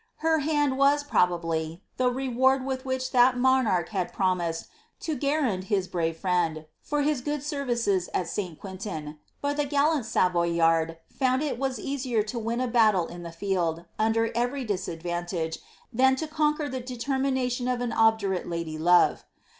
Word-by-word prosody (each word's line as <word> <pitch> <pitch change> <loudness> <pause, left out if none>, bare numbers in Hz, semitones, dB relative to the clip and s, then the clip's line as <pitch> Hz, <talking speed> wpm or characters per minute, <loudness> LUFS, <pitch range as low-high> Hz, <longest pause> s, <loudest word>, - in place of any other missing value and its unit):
Her 320 -1 +4
hand 290 -2 +1
was, 285 +1 +4
probably, 170 - 0
the 255 -1 +3
reward 260 +1 +1
with 265 0 -3
which 260 0 -2
that 250 0 +5
monarch 245 -9 +2
had 190 -4 -2
promised 175 -3 -1 0.4
to 315 - -2
giierdon 275 -9 0
his 195 -3 0
brave 165 -2 -2
friend, 170 -4 0 0.2
for 295 -1 -1
his 295 -3 +1
good 295 +1 -3
services 240 - -1
at 180 - -1
St. 175 -2 -4
Quentin, 180 -6 -6 0.2
but 285 0 -1
the 295 - +1
gallant 285 -2 +1
Savoyard 170 -3 +2
found 260 +1 +1
that 300 - 0
it 240 - -4
was 265 -2 -1
easier 255 -5 -1
to 220 +3 -4
win 230 +2 -2
a 255 - 0
battle 215 -7 +4
in 175 +1 -9
the 170 -1 -7
field, 170 -2 -1
under 225 +1 +2
every 245 +3 -1
disad 185 -5 -3
vantage, 175 -2 -3 0.3
than 265 +3 +4
to 315 - -3
conquer 300 -1 0
the 260 -2 -4
determination 255 0 -1
of 250 -1 0
an 245 -1 -2
obdurate 220 -5 +2
lady 165 -2 -4
love. 175 +2 +4
230 Hz, 165 wpm, -27 LUFS, 175-265 Hz, 0.4 s, that